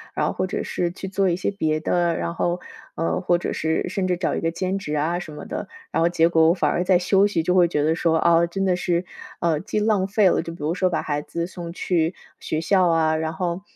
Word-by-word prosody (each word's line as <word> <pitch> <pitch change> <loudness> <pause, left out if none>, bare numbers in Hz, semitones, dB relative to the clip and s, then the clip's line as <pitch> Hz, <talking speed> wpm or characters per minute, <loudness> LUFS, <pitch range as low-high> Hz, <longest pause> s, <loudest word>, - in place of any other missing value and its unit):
然 - - +1
后 - - 0
或 185 - -2
者 - - -3
是 175 - -1
去 190 +1 -7
做 195 -1 +1
一 170 - +1
些 180 - -2
别 155 -6 -1
的， 170 0 +1
然 170 - -3
后， 175 +1 -1 0.3
呃， 165 +2 -1
或 175 -1 +2
者 - - -3
是 160 0 -1
甚 190 -2 -1
至 180 - +1
找 175 - -1
一 - - -1
个 165 - -1
兼 185 +3 -2
职 150 -5 -4
啊 160 +4 0
什 165 -3 -8
么 150 - -8
的， - - -5 0.2
然 - - 0
后 165 - +4
结 170 -1 +3
果 160 -1 +4
我 165 - +5
反 180 - +1
而 175 - 0
在 185 -1 +5
休 195 +3 +3
息， 165 -6 -1
就 180 - +1
会 180 -2 +5
觉 150 -3 0
得 160 +2 +2
说， 165 -1 +1
哦， 170 0 +4
真 195 +3 -3
的 185 -2 +2
是， 175 0 0 0.4
呃， 165 -3 +1
既 210 +3 -2
浪 210 -3 +2
费 200 -1 +4
了 - - +2
就 165 0 -7
比 170 - -14
如 155 +3 0
说 185 0 +1
把 170 - -1
孩 145 -1 -2
子 170 +2 -4
送 170 -1 -8
去 170 -1 0 0.2
学 155 - -2
校 185 +1 +3
啊， 160 -1 +2
然 160 0 -2
后， 175 +1 -2
170 Hz, 290 characters per minute, -23 LUFS, 165-185 Hz, 0.4 s, 我